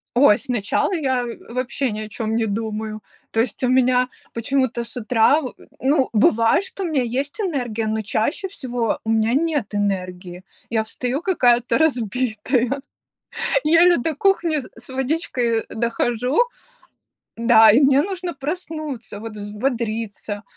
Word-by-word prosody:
Ой, 245 -5 +6
сначала 240 - -1
я, 260 -6 0
э, 235 0 -9
вообще 255 +1 -1
ни 215 - -4
о 215 - -6
чем 220 +1 -3
не 225 -1 +1
думаю. 215 0 -4 0.3
То 225 - +1
есть 255 - -2
у 250 - +2
меня 255 0 +3 0.3
почему-то 240 0 0
с 230 - -7
утра 245 +5 +3
во 255 - -6 0.3
ну, 270 0 +2
бывает, 225 - +3
что 390 - -7
у - - -1
меня 295 -6 +1
есть 270 - -3
энергия, 245 - -2
но 220 0 -1
чаще 225 - -1
всего 245 - -2
у 220 - -2
меня 225 +2 +2
нет 290 -9 0
энергии. 185 -3 -3 0.3
Я 220 -1 +1
встаю 250 +5 -3
какая-то 245 -10 +3
разбитая, 250 -1 0 0.8
еле 335 +3 +6
до 310 +5 -1
кухни 340 -1 +2
с 265 - -6 0.2
с - - -10
водичкой, 260 -4 -1
э, - - -7
дохожу. 240 +3 -1 1.0
Да, 225 -2 +7
и 240 - +5
мне 275 0 +5
нужно 365 -2 -4
проснуться, 295 - -5
вот 225 -1 -6
взбодриться, 215 -1 -3
245 Hz, 150 wpm, -21 LUFS, 220-280 Hz, 1.0 s, Да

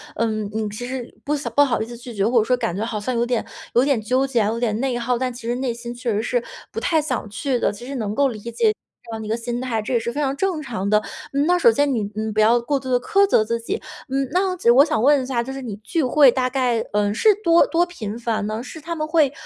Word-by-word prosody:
嗯， 215 -2 -1
你 220 -1 -1
其 210 +4 -6
实 255 -1 -6
不 295 0 0
想 290 - -4
不 285 - +7
好 245 -6 0
意 - - -1
思 240 +1 -9
拒 240 0 -9
绝， 200 -1 +1
或 240 +1 +2
者 - - +3
说 250 +2 +1
感 225 -7 -2
觉 210 +3 -2
好 225 -2 -3
像 245 +4 -2
有 235 - +1
点 240 -2 0 0.3
有 245 +3 +4
点 275 -5 +2
纠 255 +5 +1
结 245 -4 +1
啊、 205 - +1
有 230 +1 -2
点 220 -3 0
内 260 -3 0
耗， 240 +1 0
但 255 0 -2
其 240 -1 -9
实 240 - 0
内 250 -2 -2
心 240 0 -7
确 240 -1 -2
实 210 0 0
是 245 +1 -1 0.3
不 - - -3
太 320 -2 +2
想 255 -7 -3
去 255 +4 -1
的， - - +1
其 205 +4 -10
实 275 - -5
能 210 -4 -2
够 280 +5 +3
理 235 -5 -4
解 235 - -1
你 430 - +4
这 230 - -18
样 220 - -5
的 - - -6
一 - - -6
个 225 - 0
心 240 +1 -4
态， 235 -4 -1
这 215 - -4
也 235 - +3
是 235 - -3
非 285 - -4
常 275 -2 0
正 360 -1 -1
常 220 -8 -3
的。 210 0 +4 0.3
嗯， 280 +2 +2
那 355 +1 +3
首 235 - +6
先 285 +4 +1
你， 225 - 0
嗯， 215 0 -2
不 215 - -1
要 225 +3 +5
过 270 +4 -1
度 260 - -7
地 250 -1 +3
苛 400 - +3
责 225 - +4
自 230 +1 -1
己， 230 - -3 0.3
嗯， 270 0 0
那 375 +3 +2
我 365 - -2
只 235 - +4
我 260 +4 +7
想 295 -8 0
问 285 +1 +5
一 255 - -4
下， 245 -3 -1
就 265 +3 -6
是 270 - -6
你 225 -6 -5
聚 310 - -2
会 270 +1 +6
大 255 0 0
概， 250 -3 +1
嗯， 205 0 +1
是 435 - +3
多 335 -1 +5
多 345 +1 +2
频 225 - -6
繁 225 -3 -2
呢？ 220 +3 -3
是 310 +5 -9
他 335 +2 -4
们 310 -1 -2
会， 310 -4 +3
245 Hz, 330 characters per minute, -22 LUFS, 225-275 Hz, 0.3 s, 不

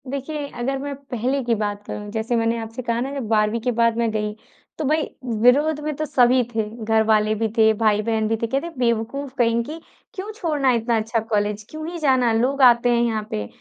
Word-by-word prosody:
देखिए, 285 +2 -4
अगर 270 +1 -3
मैं 285 +1 -4 0.2
पहले 255 +4 0
की 235 -1 +1
बात 205 -1 -3
करूँ, 210 0 -6
जैसे 225 +2 -1
मैंने 230 0 +1
आपसे 225 +2 -6
कहा 235 -1 -1
ना 265 +2 -3
जब 270 -5 -4
12वीं 215 +1 +2
के 250 +2 0
बाद 230 -1 +2
मैं 235 -1 +1
गई, 210 -1 -2 0.4
तो 310 - -2
भई, 310 +3 +2 0.4
विरोध 290 +6 +4
में 305 0 -2
तो 310 +2 -2
सभी 250 -2 +4
थे, 220 - +2 0.2
घर 220 0 +3
वाले 215 0 +3
भी 225 +1 0
थे, 220 0 +6
भाई-बहन 215 0 +2
भी 225 - +1
थे। 230 - 0
कहते, 275 +8 -2
"बेवकूफ 245 +3 -1
कहीं 230 -1 +2
की, 310 +6 -7 0.3
क्यों 400 +2 -6
छोड़ना 300 -9 +1
इतना 230 0 +1
अच्छा 225 +1 -1
कॉलेज, 210 0 0
क्यों 310 0 -6
ही 345 - -6
जाना? 260 -5 +3
लोग 260 +5 +1
आते 245 -1 +6
हैं 235 -1 +3
यहाँ 220 -2 -1
पे 105 -1 -3
235 Hz, 215 wpm, -22 LUFS, 220-275 Hz, 0.4 s, थे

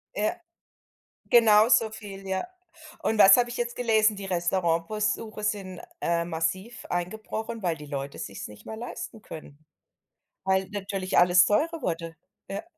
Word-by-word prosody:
Ja, 210 - 0 0.9
genau 220 -2 +6
so 225 -3 +4
viel, 195 -3 -9
ja, 190 - -2 0.6
und 220 -1 0
was 195 - +10
habe 240 -1 +2
ich 240 - -6
jetzt 240 0 -2
gelesen? 220 -3 +3
Die 195 -1 -7
Restaurantbesuche 190 +5 -1
sind, 195 -4 -3 0.2
äh, 170 0 0
massiv 185 +7 -3
eingebrochen, 220 +5 -4
weil 170 -3 0
die 150 -1 -10
Leute 140 -1 -5
sich's 100 - -6
nicht 105 - -14
mehr 220 - -7
leisten 225 -1 -7
können, 155 -1 -11 0.8
weil 190 0 +2
natürlich 195 -2 -2
alles 180 0 +6
teurer 320 - 0
wurde. 165 -1 -3 0.3
Ja. 195 +7 -5
195 Hz, 145 wpm, -27 LUFS, 175-220 Hz, 0.9 s, was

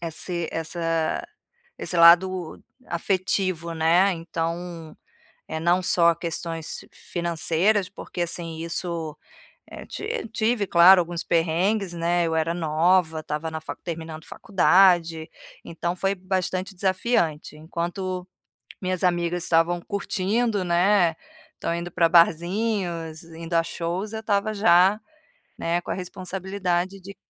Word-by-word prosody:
esse 170 +1 -3
essa 165 0 -2 0.5
esse 180 - -2
lado 175 0 +5 0.3
afetivo, 185 -1 -1
né. 170 +5 +3
Então, 165 0 -5 0.5
eh, 160 - -4
não 175 +3 +2
só 170 -1 +4
questões 165 -1 -5
financeiras, 175 +3 0
porque, 180 - -7
assim, 165 -1 -3
isso, 165 -2 -3 0.5
eh, - - -9
ti 435 - -5
tive 220 -2 0
claro 180 +2 +7
alguns 170 0 -4
perrengues, 175 +4 +1
né, 170 0 +1
eu 160 - -1
era 160 +1 +1
nova, 165 0 +2
estava 155 +1 -4
na 160 0 -5
fa - - -6
terminando 160 -2 -7
faculdade, 175 -5 +3 0.3
então 170 +2 -4
foi 195 +2 0
bastante 185 0 -3
desafiante. 185 -5 0
Enquanto 180 +3 -4 0.5
minhas 185 -1 -2
amigas 175 0 0
estavam 170 +1 +2
curtindo, 200 +1 -1
né, 175 -1 +3 0.4
tão 170 - -2
indo 170 +1 -4
pra 165 -1 +3
barzinhos, 170 -1 +1
indo 165 +1 -9
a 165 0 +3
shows, 175 +6 -4
eu 220 - -3
estava 210 0 0
já, 195 0 +4 0.6
né, 170 +1 0
com - - -12
a - - +1
responsabilidade 185 0 -3
de 195 +1 -11
175 Hz, 120 wpm, -24 LUFS, 165-185 Hz, 0.6 s, claro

